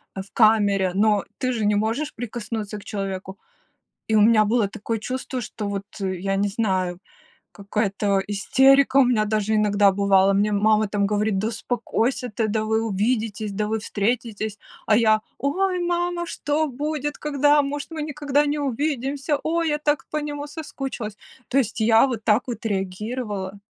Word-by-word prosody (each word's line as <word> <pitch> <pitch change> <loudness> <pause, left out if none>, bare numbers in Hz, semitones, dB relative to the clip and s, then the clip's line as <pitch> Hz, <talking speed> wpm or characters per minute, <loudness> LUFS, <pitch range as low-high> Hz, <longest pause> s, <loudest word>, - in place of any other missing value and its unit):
э, 190 - -3
в 195 - -14
камере, 205 -4 +4
но 210 0 +3
ты 255 -1 -1
же 220 -3 -1
не 210 0 +3
можешь 225 +9 -1
прикоснуться 220 -2 -5
к 200 - -11
человеку. 195 -2 -5 0.7
И 220 - +3
у - - +5
меня 215 0 +5
было 220 0 +2
такое 225 +1 -4
чувство, 255 +2 -4
что 210 -2 -5
вот 200 0 -3 0.2
я 190 0 -2
не 200 +1 +1
знаю, 185 -4 -1 0.5
какая-то 200 -1 -1
истерика 265 +6 +4
у 275 - +7
меня 220 -4 +2
даже 215 0 0
иногда 205 -1 +4
бывало, 195 0 +4
мне 205 +2 +2
мама 215 +1 +3
там 200 -1 0
говорит: 210 -1 0
"Да 215 +3 0
успокойся 245 +1 -2
ты! 225 - 0
Да 215 +1 0
вы 220 +1 +1
увидитесь! 215 0 -1
Да 210 +1 -1
вы 220 +1 -1
встретитесь!" 215 0 -2 0.3
А 215 - +4
я: 220 -2 +4 0.2
"Ой, 365 +6 0
мама, 350 0 -1
что 305 0 -1
будет, 295 +2 -3
когда? 290 0 +3
Может, 285 +2 -4
мы 315 -2 -4
никогда 295 -1 0
не 295 +1 -1
увидимся? 280 +1 -1
Ой, 330 0 0
я 295 - 0
так 295 -1 0
по 305 - -3
нему 295 -1 -4
соскучилась!" 270 -8 -6 0.3
То 270 - +2
есть 235 -3 -1
я 225 +3 +5
вот 235 -5 -4
так 215 +2 +3
вот 240 -1 -6
реагировала. 205 0 -3
220 Hz, 170 wpm, -23 LUFS, 205-275 Hz, 0.7 s, у